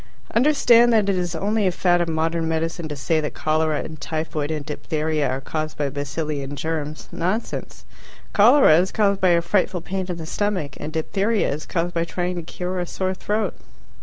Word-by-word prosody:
Understand 240 -2 +5
that 215 -3 +3
it 195 - +2
is 175 -2 -2
only 205 +4 +1
a - - +2
fad 175 0 +2
of 170 - 0
modern 165 +1 0
medicine 165 +1 -2
to 150 - -5
say 155 +3 0
that 150 - -4
cholera 155 -1 +1
and 155 -2 -9
typhoid 155 -2 -3
and 155 -2 -3
diphtheria 155 -1 -1
are 130 +1 -1
caused 155 +2 -4
by 145 -2 -1
bacilli 145 +1 -3
and 140 +1 -6
germs; 155 0 -4
nonsense. 185 +7 -3 0.5
Cholera 215 - +7
is 185 +1 0
caused 200 -2 +1
by 185 - +5
a 170 -1 +3
frightful 185 0 +1
pain 190 +1 -3
in 175 - -3
the 160 - -6
stomach, 180 -6 -2
and 150 - -5
diphtheria 195 +5 0
is 150 - -7
caused 175 0 -1
by 165 - +1
trying 180 +1 -2
to - - -2
cure 180 +2 -4
a 175 - -2
sore 185 +1 -2
throat. 210 +3 -1
165 Hz, 195 wpm, -23 LUFS, 155-190 Hz, 0.5 s, Cholera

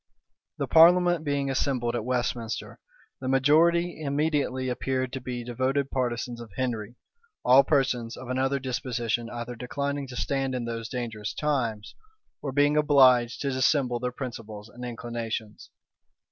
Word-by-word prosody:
The - - -1
parliament 175 0 +6
being 140 -2 -1
assembled 125 -3 0
at 115 - -2
Westminster, 120 -2 -3 0.4
the 130 - -5
majority 160 +6 +3
immediately 140 -3 0
appeared 130 +1 -2
to 135 - -4
be 125 -1 -5
devoted 130 +3 -1
partisans 120 -2 -2
of 115 - -10
Henry; 120 -3 -3 0.5
all 130 +2 +7
persons 125 -5 0
of 130 - -9
another 130 +2 0
disposition 120 -3 -2
either 120 0 -6
declining 140 +3 -3
to 125 - -9
stand 135 0 -1
in 120 -2 -3
those 115 -1 -4
dangerous 110 -4 -4
times, 120 -8 -1 0.5
or 140 - -3
being 145 +2 +3
obliged 130 -5 +5
to 140 - -1
dissemble 130 -1 +2
their 125 0 -2
principles 115 -5 -7
and 125 +2 -11
inclinations. 115 -2 -5
130 Hz, 140 wpm, -27 LUFS, 120-140 Hz, 0.5 s, all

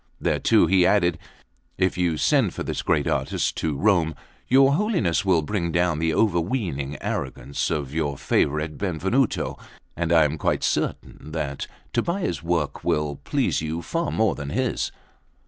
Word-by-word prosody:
Thereto - - +3
he 90 +2 +4
added: 85 -4 +3 0.6
"If 95 -1 +1
you 85 -3 0
send - - +2
for - - -3
this - - -3
great - - +1
artist - - -1
to 75 -3 -1
Rome, 85 -4 +2 0.3
your 135 +2 +5
Holiness 150 - +1
will 90 -5 +3
bring 85 0 -2
down 85 -2 +1
the 80 0 +1
overweening 85 - 0
arrogance 70 - -3
of 70 -2 -2
your 75 -3 -1
favourite 75 +2 0
Benvenuto, 95 - 0 0.4
and 85 0 -1
I 80 -2 +6
am 75 +2 -2
quite - - 0
certain 75 - -2
that 70 -4 -3 0.3
Tobbia's 170 - -1
work 85 -3 -1
will 75 -2 0
please - - 0
you 80 +2 -3
far 165 -1 -2
more 110 -2 +2
than 70 -1 -6
his." - - -1
85 Hz, 150 wpm, -24 LUFS, 75-100 Hz, 0.6 s, I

